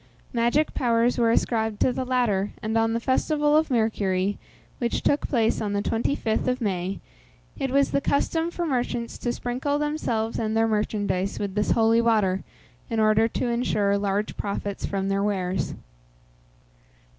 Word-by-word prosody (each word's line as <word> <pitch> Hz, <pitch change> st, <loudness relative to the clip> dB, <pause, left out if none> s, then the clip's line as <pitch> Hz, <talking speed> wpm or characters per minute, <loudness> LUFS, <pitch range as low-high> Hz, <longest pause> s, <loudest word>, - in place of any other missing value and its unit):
Magic 240 Hz, +6 st, +2 dB
powers 235 Hz, 0 st, +2 dB
were 230 Hz, -1 st, +4 dB
ascribed 220 Hz, -2 st, +1 dB
to 255 Hz, -, +3 dB
the 260 Hz, -, -2 dB
latter, 220 Hz, -6 st, +1 dB
and 220 Hz, +1 st, -2 dB
on 225 Hz, 0 st, +2 dB
the 230 Hz, -, 0 dB
festival 295 Hz, +4 st, +1 dB
of 315 Hz, +1 st, +3 dB
Mercury, 205 Hz, -5 st, 0 dB, 0.4 s
which 235 Hz, -2 st, -1 dB
took 285 Hz, -, +1 dB
place 230 Hz, -4 st, +1 dB
on 205 Hz, -2 st, -2 dB
the 200 Hz, -, 0 dB
25th 225 Hz, -1 st, 0 dB
of 255 Hz, 0 st, 0 dB
May, 190 Hz, -4 st, -2 dB, 0.6 s
it 270 Hz, -, -1 dB
was 275 Hz, +1 st, +2 dB
the 280 Hz, -, +1 dB
custom 325 Hz, +4 st, 0 dB
for 345 Hz, 0 st, -3 dB
merchants 245 Hz, -4 st, -2 dB
to 240 Hz, -, -1 dB
sprinkle 255 Hz, +4 st, -2 dB
themselves 250 Hz, -7 st, -1 dB
and 220 Hz, 0 st, -1 dB
their 225 Hz, 0 st, +3 dB
merchandise 205 Hz, -3 st, -1 dB
with 200 Hz, -2 st, -3 dB
this 210 Hz, +1 st, 0 dB
holy 225 Hz, 0 st, +4 dB
water, 210 Hz, -5 st, +2 dB, 0.5 s
in 225 Hz, -2 st, -1 dB
order 215 Hz, +1 st, +4 dB
to 230 Hz, -, -3 dB
insure 215 Hz, -4 st, +1 dB
large 200 Hz, +1 st, -1 dB
profits 200 Hz, 0 st, -3 dB
from 195 Hz, -1 st, -2 dB
their 195 Hz, 0 st, 0 dB
wares. 190 Hz, -2 st, -1 dB
225 Hz, 160 wpm, -25 LUFS, 205-250 Hz, 0.6 s, were